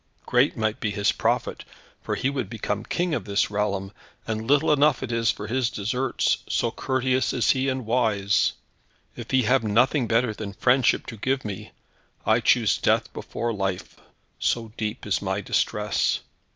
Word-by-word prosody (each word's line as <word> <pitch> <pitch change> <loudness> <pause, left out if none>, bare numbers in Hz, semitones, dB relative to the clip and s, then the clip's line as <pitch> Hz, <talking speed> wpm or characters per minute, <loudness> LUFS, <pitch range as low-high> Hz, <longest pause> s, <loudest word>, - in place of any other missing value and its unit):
Great 125 +3 +2
might 110 -1 -1
be 110 - -1
his 100 0 +1
profit, - - -1 0.4
for - - -2
he - - -1
would 140 -1 -2
become 105 -2 -3
King 175 -1 -1
of - - -2
this 100 0 0
realm, 100 -2 -1 0.3
and 110 0 -3
little 145 +2 +4
enough 150 -1 +3
is 115 -2 0
it - - +1
for 105 - -6
his 120 +2 0
deserts, 125 +5 0
so - - 0
courteous 130 0 0
is 120 -4 +3
he 135 +1 +1
and 130 -2 -3
wise. 105 -4 +2 0.6
If - - -8
he 130 -1 +3
have 125 +3 +3
nothing 120 +5 +2
better 115 0 +2
than 105 -2 -6
friendship 125 +5 +2
to 115 - -8
give 130 +4 -1
me, 100 -3 -6 0.5
I - - +4
choose - - +3
death - - +1
before 120 0 -3
life, 95 -3 -3 0.4
so 115 -2 -1
deep 110 +2 -4
is 105 - 0
my 95 0 -1
distress." 105 0 0
115 Hz, 170 wpm, -25 LUFS, 105-130 Hz, 0.6 s, little